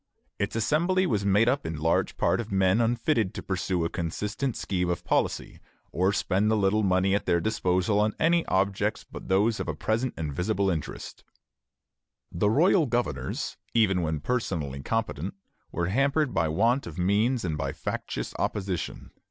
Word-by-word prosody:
Its 100 +2 -2
Assembly 170 - +2
was 105 - 0
made 105 +4 +4
up 135 +3 +1
in 80 - -4
large 80 +2 0
part - - +2
of 110 - -9
men 95 +3 +3
unfitted 115 -2 +1
to - - -5
pursue 90 -2 -1
a - - -1
consistent 105 - -3
scheme 90 -2 -1
of 85 0 -2
policy, - - -1 0.3
or 95 +3 +2
spend 100 +1 +1
the 110 - +2
little 100 +1 +2
money 95 -1 +2
at 100 - -1
their 85 - +3
disposal 95 0 +1
on 105 0 +1
any 170 +1 +3
objects 100 +3 0
but - - -10
those 105 +4 +2
of - - -3
present 115 +3 0
and 75 -3 -3
visible 100 +4 0
interest. 80 -4 -6 1.1
The 105 +5 +1
royal 160 - +4
governors, 120 0 -2 0.2
even 95 -5 +3
when 80 -2 -2
personally 80 - -2
competent, 100 -2 -2 0.4
were 85 +1 -1
hampered 140 +5 +1
by 80 - +1
want 115 - +1
of 85 -1 -8
means 105 +6 +1
and 80 -3 -1
by 75 - -2
factious - - -4
opposition. 95 -4 -3
100 Hz, 165 wpm, -27 LUFS, 90-115 Hz, 1.1 s, made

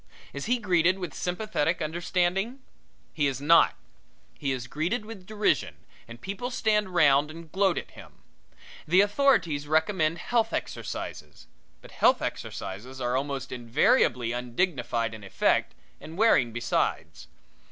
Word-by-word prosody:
Is 140 - -5
he 250 +2 +2
greeted 185 -4 +2
with 180 -2 -6
sympathetic 180 -3 -1
understanding? 180 - -1 0.5
He 145 -3 +1
is 135 -2 -2
not. 155 +4 +5 0.6
He 140 -2 -2
is 125 -2 -3
greeted 175 - -2
with 205 -4 -10
derision 215 -1 0 0.3
and 115 0 -11
people 200 - -5
stand 215 -5 +1
round 145 -2 +4
and 165 0 -11
gloat 190 -2 +2
at - - -5
him. - - -13 0.7
The 180 +5 +5
authorities 205 - +2
recommend 160 +1 +1
health 225 +4 0
exercises, 75 -1 -6 0.4
but - - -13
health - - +3
exercises 120 +8 -6
are 125 0 -1
almost 135 -1 -3
invariably 120 0 +2
undignified 120 - -1
in 110 -2 -10
effect 100 - +1 0.2
and 160 +2 -10
wearing 205 - +4
besides. 120 +1 -2
160 Hz, 130 wpm, -27 LUFS, 130-195 Hz, 0.7 s, not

